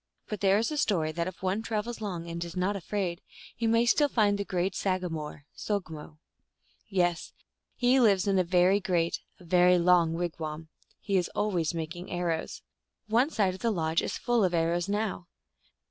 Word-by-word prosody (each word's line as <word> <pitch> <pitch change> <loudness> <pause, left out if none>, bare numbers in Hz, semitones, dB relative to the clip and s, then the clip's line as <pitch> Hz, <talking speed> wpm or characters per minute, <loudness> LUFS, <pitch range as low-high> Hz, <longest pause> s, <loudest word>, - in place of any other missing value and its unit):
But 210 - -4
there 195 0 +4
is 230 +7 0
a 300 - -2
story 175 - +1
that 170 +2 -2
if 185 0 -8
one 190 +3 0
travels 225 +1 -3
long, 175 -5 -4
and 170 0 -4
is 170 0 -8
not 185 +3 0
afraid, 190 -2 -3 0.3
he 230 - -1
may 230 +1 +3
still 290 +4 +3
find 210 -5 +3
the - - 0
great 185 -1 -1
sagamore 165 -7 -3
(so^mo). 160 -7 -4 0.7
Yes. 175 -3 0 0.4
He 250 +1 +3
lives 200 -6 +4
in 195 -2 +2
a - - +3
very 180 +3 +3
great, 175 -4 0 0.2
a - - -15
very 180 +1 +4
long 170 -2 +4
wigwam. 160 -2 -4 0.3
He 195 -3 +1
always 175 -6 0
making 165 +2 -5
arrows. 175 -2 -3 0.5
One 240 +6 +3
side 200 -10 +1
of 190 - -9
the 235 - +1
lodge 165 -5 0
is - - -3
full 240 -2 +1
of 180 -2 +1
arrows 170 +2 0
now. 205 -4 -2
185 Hz, 175 wpm, -28 LUFS, 170-210 Hz, 0.7 s, there